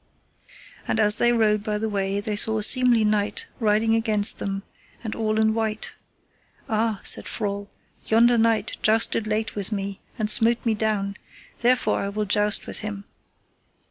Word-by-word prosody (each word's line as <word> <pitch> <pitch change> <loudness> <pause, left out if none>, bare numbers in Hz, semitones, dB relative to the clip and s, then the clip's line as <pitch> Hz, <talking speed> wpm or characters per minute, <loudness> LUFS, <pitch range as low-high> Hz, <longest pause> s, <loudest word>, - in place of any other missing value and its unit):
And 225 - -1
as 210 0 +4
they 240 - +3
rode 215 -3 +2
by 210 -1 -2
the 220 +1 -2
way 200 -1 -1
they 210 0 -3
saw 220 +1 +2
a 215 - 0
seemly 245 -1 +4
knight 210 -1 -1
riding 220 0 +2
against 215 -2 +1
them, 195 0 -3 0.4
and 220 - -4
all 215 -1 -1
in 220 0 +2
white. 220 -1 -3 0.8
Ah, 220 -1 -1
said - - +5
Frol, 200 -2 -4 0.4
yonder 235 +2 +4
knight 225 -1 +1
jousted 220 0 +1
late 215 +1 -2
with 200 0 -2
me 200 -1 -4 0.2
and 215 - -1
smote 230 +3 +1
me 225 - +2
down, 210 -2 -2 0.4
therefore 250 +1 +2
I 200 - -3
will 210 +1 -3
joust 210 +1 0
with - - -4
him. 205 -2 -6
215 Hz, 165 wpm, -23 LUFS, 205-225 Hz, 0.8 s, said